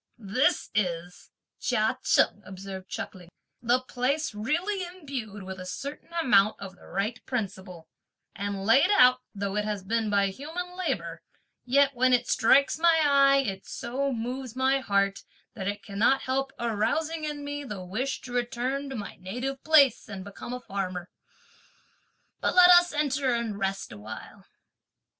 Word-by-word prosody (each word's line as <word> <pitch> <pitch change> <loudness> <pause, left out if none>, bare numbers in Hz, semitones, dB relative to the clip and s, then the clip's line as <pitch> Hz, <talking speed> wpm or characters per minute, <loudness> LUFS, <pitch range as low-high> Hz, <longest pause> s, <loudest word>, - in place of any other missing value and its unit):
"This 240 - 0
is," 175 -3 -2 0.3
Chia - - 0
Cheng - - +3
observed 190 0 -8
chuckling, 180 -2 -7 0.3
"the 245 +2 +2
place 255 +3 -1
really 340 - -1
imbued 275 - -7
with 190 0 -7
a 185 - -7
certain 280 - -7
amount 215 -11 +3
of 195 -1 -8
the - - -17
right 205 +6 -3
principle; 190 -8 -5 0.5
and 200 -1 -4
laid 265 - +5
out, 250 0 +6 0.2
though 200 0 -3
it 210 - +1
has 210 -2 -3
been 220 +2 0
by 200 -1 +2
human 330 - -6
labour, 370 -1 -3 0.4
yet 280 +2 +4
when 255 +1 +3
it 245 -1 +2
strikes 275 +5 +4
my 335 -1 +5
eye, 275 -1 +5
it 195 -3 -5
so 275 +3 -2
moves 250 +1 -4
my 265 +1 +2
heart, 200 -5 0 0.3
that 195 -5 -5
it 205 -1 -3
cannot 210 +8 +2
help 270 +1 -1
arousing 235 +9 -1
in 295 -1 -4
me 290 0 -4
the 205 -8 -7
wish 250 +9 -3
to 245 - -9
return 250 +3 -2
to 265 - -5
my 210 -4 -6
native 250 +8 -5
place 285 -8 +4
and 195 -2 -6
become 200 +4 -9
a 250 - -4
farmer. 185 -5 -5 1.3
But - - 0
let 360 0 +9
us 350 0 +7
enter 285 -4 0
and 225 -3 -3
rest 195 0 -2
a 105 - -10
while." 110 +1 -10
240 Hz, 155 wpm, -27 LUFS, 200-275 Hz, 1.3 s, let